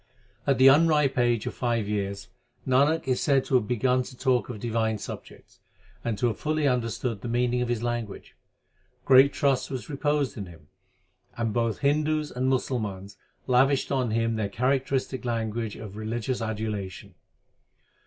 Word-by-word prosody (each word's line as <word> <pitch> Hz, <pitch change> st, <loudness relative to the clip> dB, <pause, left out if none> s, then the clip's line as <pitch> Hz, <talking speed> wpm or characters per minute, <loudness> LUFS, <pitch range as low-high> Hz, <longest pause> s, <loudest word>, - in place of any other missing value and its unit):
At 135 Hz, -, +3 dB
the 130 Hz, -, +5 dB
unripe 150 Hz, -1 st, +5 dB
age 120 Hz, -3 st, +2 dB
of -, -, -3 dB
five 115 Hz, -4 st, -1 dB
years 100 Hz, -1 st, -3 dB, 0.4 s
Nanak 140 Hz, +4 st, +3 dB
is 130 Hz, -1 st, +1 dB
said 135 Hz, -2 st, +2 dB
to -, -, -5 dB
have 120 Hz, -5 st, +3 dB
begun 125 Hz, +2 st, +2 dB
to 125 Hz, 0 st, -9 dB
talk 130 Hz, -2 st, +1 dB
of 115 Hz, -4 st, -6 dB
divine 110 Hz, -1 st, -1 dB
subjects, -, -, -10 dB, 0.4 s
and 115 Hz, -3 st, -2 dB
to 125 Hz, -, 0 dB
have 115 Hz, -4 st, -1 dB
fully 155 Hz, -1 st, 0 dB
understood 115 Hz, -3 st, -1 dB
the -, -, -5 dB
meaning 125 Hz, +1 st, +1 dB
of 125 Hz, -, -1 dB
his 120 Hz, -1 st, -1 dB
language. 120 Hz, -4 st, -4 dB, 0.7 s
Great 135 Hz, +1 st, +7 dB
trust 135 Hz, -2 st, +1 dB
was 130 Hz, -1 st, -6 dB
reposed 145 Hz, -4 st, 0 dB
in 100 Hz, -, -5 dB
him; 80 Hz, -4 st, -15 dB, 0.7 s
and 115 Hz, -2 st, -1 dB
both 115 Hz, -1 st, -1 dB
Hindus 150 Hz, +1 st, +1 dB
and 130 Hz, +1 st, -1 dB
Musalmans 105 Hz, -7 st, -2 dB, 0.3 s
lavished 130 Hz, +2 st, +2 dB
on 130 Hz, -3 st, +1 dB
him 115 Hz, 0 st, 0 dB
their 105 Hz, -2 st, -1 dB
characteristic 130 Hz, +3 st, -1 dB
language 115 Hz, -2 st, -2 dB
of 105 Hz, -2 st, -9 dB
religious 115 Hz, +3 st, -3 dB
adulation. 105 Hz, -4 st, -4 dB
120 Hz, 160 wpm, -26 LUFS, 110-135 Hz, 0.7 s, Great